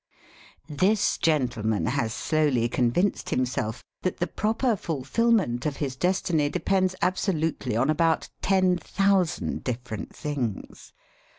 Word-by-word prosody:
This 190 +8 +1
gentleman 120 -9 +1
has 125 -4 0
slowly 145 -4 +1
convinced 125 +12 0
himself 125 -3 -1 0.2
that 185 - -2
the 175 - 0
proper 225 +5 0
fulfilment 165 - 0
of 145 - -3
his 135 -3 -3
destiny 170 -2 +1
depends 185 +3 +1
absolutely 165 - 0
upon 130 +6 +2
about 165 +1 +1
ten 185 -2 +3
thousand 195 -2 0
different 120 -3 -5
things. 130 -9 -4
155 Hz, 110 wpm, -26 LUFS, 125-185 Hz, 0.2 s, ten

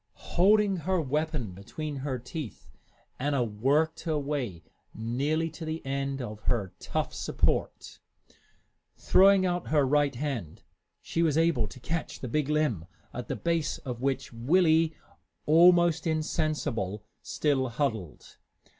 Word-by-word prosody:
Holding 200 +2 +4
her 180 +3 0
weapon 150 - -1
between 140 - -6
her 135 -1 -3
teeth, 125 - -8 0.5
Anna 140 -1 +1
worked 135 +9 +1
her 160 -2 0
way 135 - -3 0.3
nearly 140 +9 -1
to 160 - -9
the 160 -1 -4
end 135 0 -2
of 105 -2 -7
her 105 -7 0
tough - - -3
support. - - -1 1.0
Throwing 195 0 +5
out 175 -1 -1
her 150 -3 +3
right 145 0 +2
hand, 120 - -4 0.4
she 165 - -1
was 160 -3 +2
able 160 -9 +2
to 100 - -11
catch 160 +5 -4
the 130 - -5
big 150 +4 -1
limb, 150 - 0 0.3
at 125 0 -6
the - - -2
base 165 -3 -1
of 125 -3 -6
which 135 -2 -1
Willie, 160 +5 +3 0.5
almost 170 +1 +5
insensible, 155 - -1 0.2
still 135 -4 0
huddled. 115 - -3
145 Hz, 130 wpm, -28 LUFS, 120-160 Hz, 1.0 s, Throwing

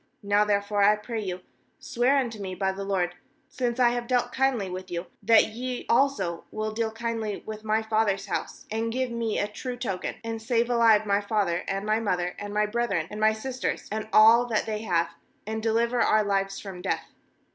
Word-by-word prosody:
^Now 205 +1 +3
therefore, 205 0 +1
I 205 +1 +6
pray 220 +2 -5
you, 185 -3 -4 0.4
swear 250 +4 +1
unto 235 -5 -1
me 185 -1 -4
by 190 0 0
the 195 +1 -6
LORD, 185 -3 0 0.3
since 245 -1 -2
I 245 -1 +6
have 240 0 -3
dealt 245 -1 +1
kindly 260 -7 +1
with 185 0 -6
you, 175 +1 -3 0.2
that 220 +1 +5
ye 250 +3 -5
also 225 -10 +1
will 215 0 -3
deal 225 +1 -1
kindly 225 -2 -3
with 215 0 -7
my 220 +1 +1
father's 215 -3 +1
house - - -4
— - - -23
and 225 +1 -1
give 255 +1 -1
me 230 -2 -1
a 205 - 0
true 245 +4 -6
token 195 -7 -3
— - - -37
13and 225 -1 -4
save 235 +1 +1
alive 225 -3 +5
my 200 0 +2
father, 200 -4 0
and 195 +1 -2
my 215 +1 +2
mother, 180 -5 -1
and 205 0 -6
my 210 +1 +2
brethren, 210 -7 -1
and 210 - -6
my 215 0 +5
sisters, 255 +3 -3
and 215 0 -3
all 230 +3 +7
that 220 -3 0
they 215 -1 -3
have, 170 -5 +1 0.4
and 220 +1 -3
deliver 230 +2 +1
our 215 0 +4
lives 195 -1 -1
from 190 -3 -8
death.' 190 - -3
215 Hz, 210 wpm, -26 LUFS, 200-235 Hz, 0.4 s, all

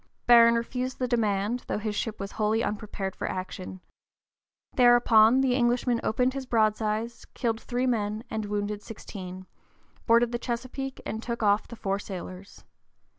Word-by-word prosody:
Barron 235 -1 +7
refused 250 +2 -2
the 255 - -1
demand, 220 -1 0
though - - -1
his 215 0 -3
ship 220 +1 -3
was 195 0 -5
wholly 220 +1 0
unprepared 205 -3 -4
for - - -3
action. 185 0 -6 0.9
Thereupon 240 -1 +6
the 260 -2 +2
Englishman 245 -1 +1
opened 250 +3 +1
his 270 -1 -5
broadsides, 220 0 0
killed 230 -3 -1
three 250 +1 -2
men 215 -3 -1
and 220 -1 -3
wounded 205 0 -3
sixteen, 185 -4 -9 0.6
boarded 235 0 +4
the 240 - -2
Chesapeake 255 +3 -4
and 220 - -4
took 235 -1 -4
off 205 0 +3
the 235 - -9
four 195 -3 -2
sailors. 185 -1 -9
225 Hz, 150 wpm, -27 LUFS, 205-240 Hz, 0.9 s, Barron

